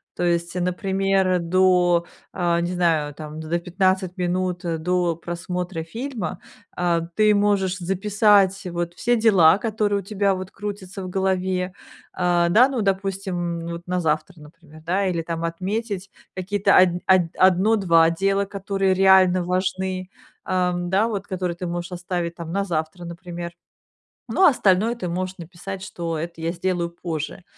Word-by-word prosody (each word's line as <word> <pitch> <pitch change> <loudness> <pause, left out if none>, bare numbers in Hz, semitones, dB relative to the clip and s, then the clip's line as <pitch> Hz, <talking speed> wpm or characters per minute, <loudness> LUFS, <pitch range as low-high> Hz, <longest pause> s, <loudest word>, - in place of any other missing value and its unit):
То - - -3
есть, 170 0 0
например, 190 +1 +1
до, 175 0 +3 0.3
э, 170 -1 +1
не 175 +1 -2
знаю, 160 -5 +1
там, 155 0 -8
за 160 +2 -1
15 185 +1 0
минут 180 0 -1
до 170 0 0
просмотра 175 0 -4
фильма, 225 - -5 0.4
э, 175 -1 +2 0.2
ты 215 -1 +4
можешь 200 -2 +1
записать, 195 +1 +3
вот, 175 -1 -3
все 240 +6 +1
дела, 195 -7 +5
которые 210 -2 0
у - - -15
тебя, 200 -1 0
вот, 185 0 -7
крутятся 200 -1 -6
в 185 - -5
голове. 185 -1 -1 0.4
Э, 175 -1 +2
да, 245 +8 +6
ну, 255 -5 -2
допустим, 190 -3 -2
вот, 170 +1 -7
на 180 0 0
завтра, 155 +2 -1
например, 155 +1 -16
да, 190 +3 +1
или 170 -3 -1
там 165 0 -4
отметить 195 +3 -3 0.2
какие-то 200 +2 +2
од 185 0 +7 0.2
од 185 -1 +6
1-2 185 -3 +4
дела, 195 +3 +1
которые 195 -1 -1
реально 185 -1 +5
важны, 185 0 -2 0.4
э 180 -1 +1
да, 185 +5 +1
вот, 205 -3 -3
которые 180 -3 -3
ты 180 - -5
можешь 175 +1 -4
оставить, 175 -1 -3
там, 165 -1 -7
на 200 +3 0
завтра, 165 0 -3
например. 170 0 -7 0.8
Ну, 380 - +2
а 360 - +9
остальное 215 -2 +2
ты 210 -7 -5
можешь 185 +2 -3
написать, 180 +3 -8
что 170 -4 -4
это 165 +1 -6
я 165 +1 -1
сделаю 175 -1 -1
позже. 170 0 -5
180 Hz, 150 wpm, -23 LUFS, 170-195 Hz, 0.8 s, а